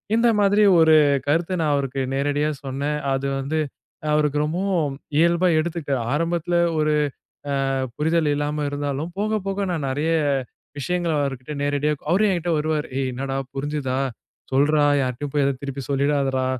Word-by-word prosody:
இந்த 235 +1 +4
மாதிரி 205 +1 +4 0.2
ஒரு 160 -1 +6 0.3
கருத்த 165 +5 +1
நான் 150 -2 +2
அவருக்கு 135 -1 -2
நேரடியா 145 +2 0 0.2
சொன்னேன். 140 +3 -2
அது 135 +1 -1
வந்து 145 +4 -1 0.5
அ - - -2
அவருக்கு 150 -1 +2
ரொம்பவும் 170 -3 0 0.2
இயல்பா 170 +3 +4
எடுத்துக்கிட்டாரு, 155 -5 -2
ஆரம்பத்தில 170 +2 0 0.2
ஒரு 150 0 +2 0.8
அ - - +1 0.2
புரிதல் 155 0 +1
இல்லாம 150 +1 -1
இருந்தாலும் 145 +3 -3
போக 215 +1 0
போக 195 0 -2
நான் 155 -5 -2
நிறைய 145 +5 0 0.7
விஷயங்கள 175 +3 -1
அவர்கிட்ட 135 +1 -4
நேரடியா 145 +1 +1 0.2
அவரும் 200 +4 +3
என்கிட்ட 175 -1 -1
வருவாரு, 150 0 -1
"ஏய் 135 -1 0
என்னாடா? 135 +1 -3 0.2
புரிஞ்சுதா 135 -2 -2 0.5
சொல்றா, 145 +3 +3 0.2
யார்டயும் 130 +2 -3
போயி 145 - +2
ஏதோ 140 - +2
திருப்பி 140 0 -5
சொல்லிடாதடா, 140 -2 +1
150 Hz, 145 wpm, -23 LUFS, 140-165 Hz, 0.8 s, ஒரு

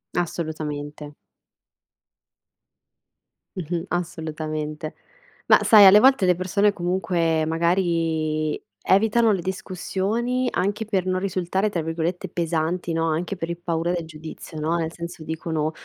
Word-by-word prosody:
Assolutamente. 150 -3 -4 2.4
Mh-mh. 175 0 -3
Assolutamente. 155 -3 -4 0.5
Ma - - +7
sai 210 -3 +8
alle 195 +2 +9
volte 260 -4 +5
le 180 -1 +4
persone 200 +3 +1
comunque 175 -3 0
magari 165 -2 0 0.3
evitano 220 +3 +4
le 190 - -1
discussioni, 200 +7 -2
anche 205 +3 -1
per 195 -4 -1
non 185 0 0
risultare 190 +1 -1
tra 175 -5 -2
virgolette 165 +2 -3
"pesanti," 170 +1 -1
no, 165 0 0
anche 170 +5 -2
per 165 -2 -5
il 170 - -3
paura 170 0 -1
del 175 -2 -2
giudizio, 155 0 -9
no, 160 +2 0
nel 165 -1 -2
senso 170 -1 -7
dicono: 160 -1 -2
170 Hz, 120 wpm, -23 LUFS, 160-190 Hz, 2.4 s, alle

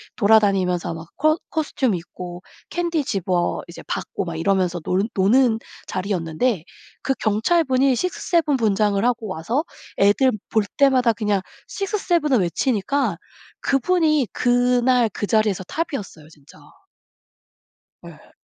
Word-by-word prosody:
돌아다니면서 195 -6 +2
막 165 0 -9
코 310 +3 +3
코스튬 285 -7 -1
입고 175 +1 -8 0.3
캔디 340 -3 -1
집어 180 -6 -1
이제 170 - -10
받고 - - -3
막 170 -3 -5
이러면서 180 0 +1
논 190 +6 -1
노는 225 +4 +3 0.3
자리였는데 185 +1 -1 0.4
그 270 - 0
경찰분이 260 +5 +2
6-7 330 +1 0
분장을 210 -3 +1
하고 235 -2 0
와서 210 - -2 0.3
애들 205 +7 +4 0.2
볼 220 - +2
때마다 260 -4 +4
그냥 210 -3 0 0.3
6-7 370 -6 -1
을 250 - +5
외치니까 255 +9 0 0.4
그분이 305 -1 +2
그날 245 -1 +2
그 205 - -4
자리에서 215 -4 +1
톱이었어요 205 - -5
진짜. 145 -3 -19 1.5
예. - - -14
220 Hz, 250 characters per minute, -22 LUFS, 190-270 Hz, 1.5 s, 을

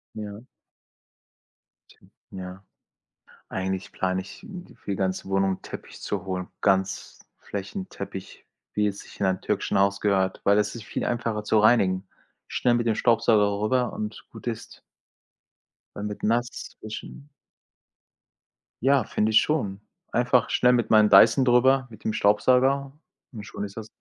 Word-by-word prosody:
Ja. 105 -1 -7 1.9
Ja. 95 0 -8 0.8
Eigentlich 95 0 -3
plane 95 0 -1
ich, 100 - -12 0.3
für - - -7
die - - 0
ganze 95 0 -2
Wohnung 95 -1 +1
Teppich - - -10
zu 100 -3 -3
holen. 90 -1 -3
Ganz 95 -1 0 0.2
Flächenteppich, 100 - -7 0.3
wie 105 0 +2
es 100 -1 -4
sich - - -13
in - - +1
einem 95 -1 +1
türkischen - - -1
Haus 100 0 +2
gehört, 95 -2 +1
weil 100 +1 +4
es 105 - 0
ist 115 - -7
viel - - -4
einfacher 115 -3 -2
zu 110 +1 +3
reinigen, 100 -4 +3 0.4
schnell 120 - +1
mit 120 0 +1
dem 110 - +2
Staubsauger 105 -3 +3
rüber 125 +2 +1
und 105 0 -6
gut - - -11
ist. - - -6 1.2
Weil 100 - -5
mit 105 -1 -5
nass 120 +2 -1
wischen 110 +6 -8 1.6
Ja, 135 -1 +4
finde 105 +1 0
ich 110 - +6
schon. 105 -11 -1 0.3
Einfach 120 0 +2
schnell 125 - +4
mit 120 -2 +1
meinem 110 -1 +6
Dyson 110 +7 +7
drüber, 130 +2 +4
mit 110 -2 -14
dem 110 - 0
Staubsauger, 130 +7 +3 0.4
und 110 -5 -8
schon 105 - -6
ist 100 0 -10
das 110 -1 -6
105 Hz, 145 wpm, -25 LUFS, 95-120 Hz, 1.9 s, Dyson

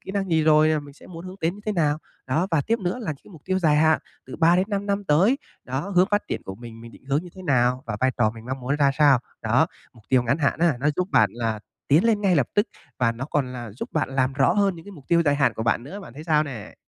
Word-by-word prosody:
kỹ - - -8
năng 195 -2 -2
gì 160 -1 +3
rồi 155 0 +5
và 150 - 0
mình 145 -1 -12
sẽ - - -16
muốn 170 0 -9
hướng 185 +1 -9
đến 165 +2 0
như 205 - -12
thế 215 - 0
nào? 155 -4 +1 0.3
Đó, 155 +8 +1
và 165 -4 +2
tiếp 230 +1 +1
nữa 190 +3 -2
là 160 -10 -3
những - - -11
cái - - -16
mục 155 - -14
tiêu 185 0 0
dài 155 -4 +3
hạn 160 +1 +4 0.3
từ 130 - -8
3 170 +2 +4
đến 185 +1 +1
5 200 0 -2
năm 200 0 -1
tới, 190 - +3 0.3
đó, 135 +8 -3
hướng 180 - +6
phát 205 0 +2
triển - - -3
của 95 - -6
mình, 115 +1 -11
mình 115 0 -12
định - - -17
hướng 140 +4 0
như 180 - -10
thế 185 - -9
nào 125 -4 +2
và 105 -2 -3
vai 130 0 +3
trò 110 -3 +3
mình 115 0 -11
mong 130 0 -4
muốn 135 +4 -1
ra 140 -2 +3
sao. 145 -4 +6 0.2
Đó, - - +3 0.3
mục 115 - -20
tiêu 130 -2 +4
ngắn 130 +6 0
hạn 150 0 +1
á, 165 -5 +2
nó 145 - +2
giúp 180 +1 -1
bạn - - +4
là 115 -2 -2 0.3
tiến 150 +8 +4
lên 220 -3 +2
ngay 190 -4 +3
lập 130 -4 +2
tức 205 +3 +2 0.3
và 115 -2 +2
nó 120 +3 -5
còn 135 -4 0
là 120 -3 -7
giúp 120 - -6
bạn - - 0
làm 130 0 +2
rõ 135 +1 +3
hơn 200 -1 +2
những 165 - -12
cái 205 - -11
mục 145 -8 -14
tiêu 170 0 +4
dài 145 -2 +2
hạn 140 - +2
của 110 - -4
bạn 115 0 +1
nữa. 195 +10 -8
Bạn 145 -12 -11
thấy 150 +3 -9
sao 155 -2 +3
nè? 120 -8 -8
150 Hz, 310 wpm, -24 LUFS, 130-180 Hz, 0.3 s, hướng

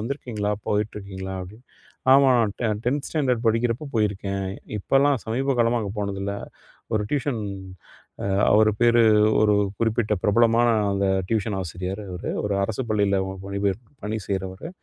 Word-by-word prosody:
வந்திருக்கீங்களா, 115 -4 -3 0.2
போயிட்டுருக்கீங்களா" 100 -2 -3
அப்படின்னு. 105 +7 -12 0.5
"ஆமாம் 135 -2 +6
நான் 110 -3 +1
டெ 120 - +1 0.2
10 135 +4 0
ஸ்டாண்டர்ட் 130 -6 0
படிக்கிறப்போ 115 +5 +1
போயிருக்கேன். 100 -2 -1 0.3
இப்போலாம் 135 +5 +3
சமீப 130 +4 0
காலமா 120 0 +3
அங்கே 100 -2 -4
போனதில்ல". 100 0 -3 0.6
ஒரு 110 - +1
டியூஷன் 140 -4 -1 0.8
அ - - -1 0.3
அவர் 110 +1 +5
பேரு 120 0 +5 0.4
ஒரு 105 -1 +4 0.2
குறிப்பிட்ட 115 -1 +1
பிரபலமான 115 +3 +4 0.3
அந்த 100 0 0 0.2
டியூஷன் 110 -2 0
ஆசிரியர் 90 +3 -5
அவரு 90 0 -5
ஒரு 105 -1 0
அரசு 110 +5 -3
பள்ளியில 100 -2 +2 0.3
பணிபெயர் 100 0 -1 0.3
பணி 110 +1 -2
செய்றவரு. 95 - -4
110 Hz, 135 wpm, -24 LUFS, 100-120 Hz, 0.8 s, ஆமாம்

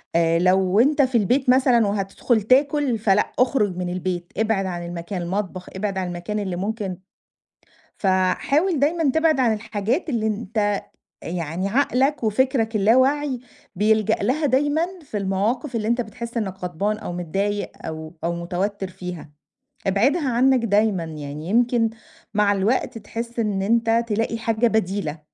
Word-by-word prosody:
آآ 165 0 +3
لو 185 +2 +3
أنت 285 +5 +4
في 260 -3 +2
البيت 250 +5 +1
مثلًا، 250 -4 +4
وهتدخل 200 +3 0
تاكل، 275 +2 +2
فلأ، 210 -1 +2
اخرج 230 -8 +2
من 180 -1 -2
البيت، 180 -1 -3
ابعد 220 -2 +1
عن 175 -2 -4
المكان، 175 +2 -5
المطبخ، 185 +1 -4
ابعد 195 0 -2
عن 185 -1 -1
المكان 175 +4 -4
اللي 190 -3 -3
ممكن 200 0 -3 1.0
فحاول 200 - +1
دايمًا 310 0 +2
تبعد 320 0 +2
عن 240 -3 +3
الحاجات 220 - -2
اللي 230 -6 0
أنت 210 -1 -1 0.4
يعني 170 +2 -3
عقلك 270 +3 +1
وفكرك 225 0 +1
اللاواعي 260 +6 +3 0.4
بيلجأ 215 +2 +3
لها 265 +9 0
دايمًا، 290 +4 +2 0.2
في 240 -7 -5
المواقف 210 +7 -1
اللي 215 -1 -1
أنت 235 +2 +2
بتحس 235 +1 -7
إنك 195 -4 -3
غضبان 195 +5 -1
أو 195 - -6
متضايق 195 +4 -2
أو 160 0 -6
أو 170 +1 0
متوتر 185 +4 -3
فيها، 180 -4 -8 0.6
ابعدها 265 - +2
عنك 250 0 +3
دايمًا 205 -4 +2
يعني. 150 -1 -7
يمكن 235 +1 +3 0.4
مع 210 -1 +3
الوقت 210 +5 0
تحس 230 +2 -6
إن 210 -4 0
أنت 230 +2 +2
تلاقي 225 +1 -1
حاجة 225 +1 +1
بديلة، 195 -7 -1
215 Hz, 145 wpm, -22 LUFS, 185-245 Hz, 1.0 s, أنت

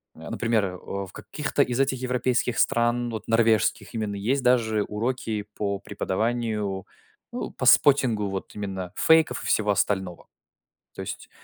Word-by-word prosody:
например, 110 +6 -1
э, 90 -1 -5
в 100 +1 -6
каких-то 150 -2 -2
из 125 -2 -3
этих 135 -1 +1
европейских 125 -1 0
стран, 120 +1 +2
вот, 110 - -6
норвежских 115 -1 +2
именно 105 -2 -2
есть 125 +7 0
даже 115 -4 +3
уроки 110 -1 -3
по 100 -1 -1
преподаванию, 105 -1 -2 0.5
э, - - -4 0.2
по - - -2
споттингу 125 -8 +5
вот 95 0 -6
именно 95 -3 -5
фейков 160 -1 +3
и - - -4
всего 105 -1 +2
остального. 95 -3 -1 0.7
То - - -6
есть - - -7
110 Hz, 140 wpm, -25 LUFS, 100-125 Hz, 0.7 s, споттингу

